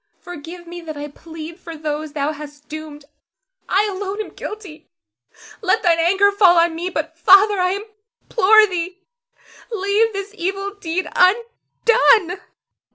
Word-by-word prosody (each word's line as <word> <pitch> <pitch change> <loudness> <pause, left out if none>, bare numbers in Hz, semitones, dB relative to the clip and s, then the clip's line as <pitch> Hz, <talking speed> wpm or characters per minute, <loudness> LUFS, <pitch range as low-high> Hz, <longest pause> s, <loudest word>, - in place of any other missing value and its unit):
Forgive 345 0 -10
me 345 +1 -9
that 310 -3 -8
I 295 0 -6
plead 325 +3 -10
for 330 -2 -9
those 305 0 -4
thou 295 0 -1
hast 295 -1 -11
doomed! 305 -2 -9 0.6
I 410 +2 +2
alone 400 +1 -4
am 430 - -5
guilty, 380 -8 -9 0.7
let 375 -3 +1
thine 335 -2 +3
anger 385 +4 +4
fall 380 -4 +5
on 335 0 +3
me; 345 +3 -4
but, 325 -2 -4
Father, 390 +3 +6
I 370 +3 0 0.4
implore 435 0 +5
thee, 360 -1 -4 0.7
leave 420 +2 +1
this 395 +1 -6
evil 390 +2 -3
deed 370 -2 -3
undone. 450 -1 +2
360 Hz, 140 wpm, -20 LUFS, 325-400 Hz, 0.7 s, Father